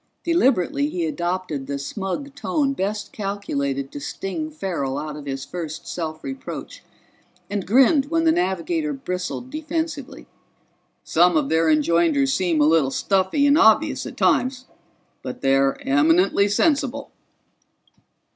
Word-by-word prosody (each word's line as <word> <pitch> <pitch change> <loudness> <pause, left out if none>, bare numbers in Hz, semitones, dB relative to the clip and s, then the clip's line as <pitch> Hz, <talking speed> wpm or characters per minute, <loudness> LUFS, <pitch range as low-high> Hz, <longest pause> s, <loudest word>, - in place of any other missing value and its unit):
Deliberately 285 - +2
he 340 +1 -2
adopted 180 - -3
the 140 - -3
smug 195 - -5
tone 280 -1 -1
best 205 -2 -3
calculated 140 -10 -3
to - - -7
sting 195 - -4
Farrell 175 - -3
out 150 0 -5
of 145 -1 -9
his 135 0 -4
first 165 -2 -6
self 155 -2 -5
reproach, 270 0 -7 0.7
and 200 -3 -3
grinned 270 - +5
when 330 +2 0
the 325 - +5
navigator 295 - -1
bristled 245 0 -5
defensively. 310 -2 -4 0.8
"Some 175 0 +3
of 145 -3 0
their 160 0 +2
enjoinders 155 -3 +3
seem 175 -4 +1
a - - +5
little 155 -3 +3
stuffy 195 - +1
and 285 +2 +5
obvious 375 - +4
at - - -10
times, 255 0 +1 0.6
but - - -7
they're 135 0 +2
eminently 165 +8 +3
sensible." 280 +4 0
190 Hz, 130 wpm, -22 LUFS, -, 0.8 s, grinned